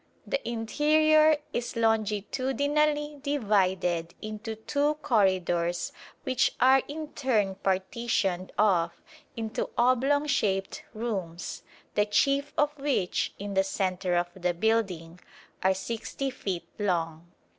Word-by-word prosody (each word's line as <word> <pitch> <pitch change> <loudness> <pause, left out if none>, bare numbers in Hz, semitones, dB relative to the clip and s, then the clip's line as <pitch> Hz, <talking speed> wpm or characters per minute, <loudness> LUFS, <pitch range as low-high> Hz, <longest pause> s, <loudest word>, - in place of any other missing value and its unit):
The - - -2
interior 305 +6 +4 0.2
is 240 0 -3
longitudinally 270 +7 0
divided 190 - 0
into 215 +1 -6
two 285 +7 0
corridors 180 - +1 0.3
which 255 -1 +1
are 265 +1 +6
in 305 +1 -6
turn 220 -10 0
partitioned 190 -1 -1
off 180 -5 +2 0.3
into 220 -1 -3
oblong 260 +4 +3
shaped 195 -9 0
rooms, 190 -7 -4 0.3
the 210 0 +2
chief 275 +7 +2
of 295 0 +2
which, 275 -10 0
in 200 0 -5
the 190 0 +3
centre 185 -2 -1
of 175 0 +1
the 180 -1 -1
building, 180 -5 0 0.4
are 190 0 +3
60 235 +6 -4
feet 190 -8 -4
long. 170 -4 -1
215 Hz, 110 wpm, -28 LUFS, 185-275 Hz, 0.4 s, are